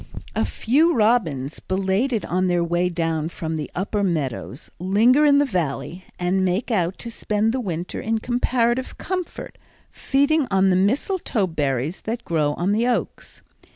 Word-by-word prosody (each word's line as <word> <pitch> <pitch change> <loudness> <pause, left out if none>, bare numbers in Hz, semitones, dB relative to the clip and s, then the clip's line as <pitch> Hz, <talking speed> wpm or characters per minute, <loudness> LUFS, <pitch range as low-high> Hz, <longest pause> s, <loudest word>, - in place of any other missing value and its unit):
A - - +1
few 305 +8 +2
robins, 175 - +1
belated 195 +6 0
on 185 +1 0
their 175 -1 +2
way 175 +1 +1
down 165 -2 -1
from 160 -1 -4
the 150 -2 -4
upper 205 +2 -1
Meadows, 145 -6 -3
linger 225 - +4
in 285 -1 +6
the 290 - +4
Valley 180 - -3
and 185 +2 +1
make 190 +7 0
out 185 -4 0
to 235 - -6
spend 220 0 0
the 260 - -1
winter 175 -4 -4
in 225 +1 0
comparative 240 +1 0
comfort, 365 -2 -5 0.3
feeding 285 +1 +1
on 190 -1 +3
the - - +3
mistletoe 225 - +1
berries 145 -2 -2
that 230 +2 -4
grow 150 -3 0
on 180 +3 0
the 225 +4 +2
oaks. 245 - -3
195 Hz, 155 wpm, -22 LUFS, 170-240 Hz, 0.3 s, in